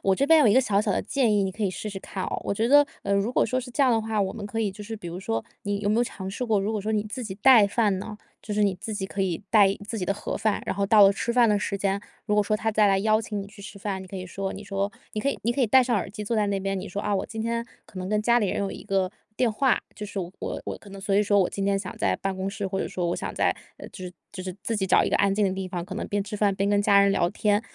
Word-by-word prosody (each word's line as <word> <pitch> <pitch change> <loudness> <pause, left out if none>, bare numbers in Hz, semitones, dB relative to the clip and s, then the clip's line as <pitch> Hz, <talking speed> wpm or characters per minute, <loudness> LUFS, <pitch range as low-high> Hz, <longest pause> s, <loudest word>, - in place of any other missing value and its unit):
我 195 -1 +3
这 275 - +1
边 320 0 +7
有 275 - +5
一 210 - +5
个 260 - +6
小 205 -5 +1
小 - - -1
的 - - +1
建 260 -6 +1
议， 200 - +3
你 190 -1 -1
可 215 - -6
以 195 - +1
试 210 +3 -5
试 195 - -6
看 190 -1 -5
哦。 - - -3
我 200 - -2
觉 225 +3 +1
得 290 +2 +6 0.2
呃， 200 - -1
如 200 +4 +1
果 - - +2
说 255 0 -1
是 250 - -9
这 280 - +1
样 255 -3 +4
的 225 - +2
话， 220 -1 -1
我 190 -1 0
们 210 -3 -6
可 225 +2 -3
以 210 - 0
就 200 +2 -10
是 225 +2 -6
比 175 - -9
如 175 +2 -6
说 115 -11 -2 0.2
你 205 0 -2
有 205 - -1
没 215 - +2
有 240 - +3
尝 190 -4 -6
试 230 - -5
过 220 -4 +2
如 205 +3 -1
果 210 - -1
说 215 +2 -3
你 210 -1 +1
自 215 +4 -6
己 190 -3 -5
带 220 -1 +7
饭 200 -2 +1
呢？ 210 +1 -7 0.2
就 210 - -5
是 210 - +2
你 200 -2 +3
自 220 - -4
己 195 -2 -3
可 195 +1 -5
以 185 -1 -1
带 210 -3 +7
一 195 - +1
自 220 +1 -5
己 180 - -2
的 200 - 0
盒 - - -4
饭， 215 -2 0
然 - - -2
后 200 0 0
到 210 0 +6
了 195 0 +7
吃 235 +3 -2
饭 240 -2 +5
的 205 -1 +3
时 200 0 -2
间， 200 0 0 0.2
如 210 - 0
果 210 - +5
说 215 +1 0
他 220 +1 -1
再 210 -1 +4
来 195 -1 +4
邀 215 +1 +3
请 210 -3 -4
你 200 - -10
去 205 -1 -15
吃 200 - -10
饭， 195 -2 -3
你 190 - -9
可 195 - -11
以 185 -1 -4
说 195 +1 -4
你 200 - -8
说 200 0 -2 0.2
你 215 - -2
可 275 - 0
以 - - -1
你 235 - +1
可 270 - -2
以 245 - +4
戴 260 +4 +6
上 245 -1 0
耳 195 - -2
机 210 +1 -7
坐 230 +2 -1
在 210 -1 +2
那 200 -1 0
边。 195 0 -2
你 190 - -6
说： 200 +2 -4
“啊， 210 - -1
我 190 - -1
今 220 -1 -5
天 235 +1 -2 0.2
可 185 - -11
能 185 +1 -4
跟 210 0 +1
家 240 +2 +4
里 210 - +1
人 - - -1
有 195 - -1
一 - - -9
个 190 -1 0 0.3
电 240 -4 +2
话。 265 +3 +2 0.2
就 210 - -5
是 200 - -4
我 175 0 -6 0.3
我 - - -5
可 200 - -15
能 195 - -9
所 195 0 0
以 - - +5
说 205 -1 +3
我 180 - +1
今 195 - -3
天 200 - +2
想 195 -2 -5
在 95 - +1
办 195 -1 -1
公 190 +1 -2
室。” 200 0 -5
或 190 0 -2
者 - - -1
说： 180 -2 -3
“我 - - -1
想 - - -5
在 - - +2 0.3
嗯， - - -10
就 185 - -8
是 180 - -7 0.2
就 195 - -8
是 185 0 -6
自 230 - -1
己 190 -2 0
找 - - +5
一 - - -1
个 - - +3
安 200 -1 +2
静 210 - +2
的 190 - +1
地 190 0 -4
方， 175 -1 -4
可 - - -7
能 - - -3
边 205 -1 -1
吃 210 +1 -6
饭 200 -1 +2
边 195 +1 0
跟 205 0 +3
家 200 -1 +5
人 200 0 +4
聊 175 -3 +2
天。 205 0 +1
205 Hz, 380 characters per minute, -26 LUFS, 195-220 Hz, 0.3 s, 边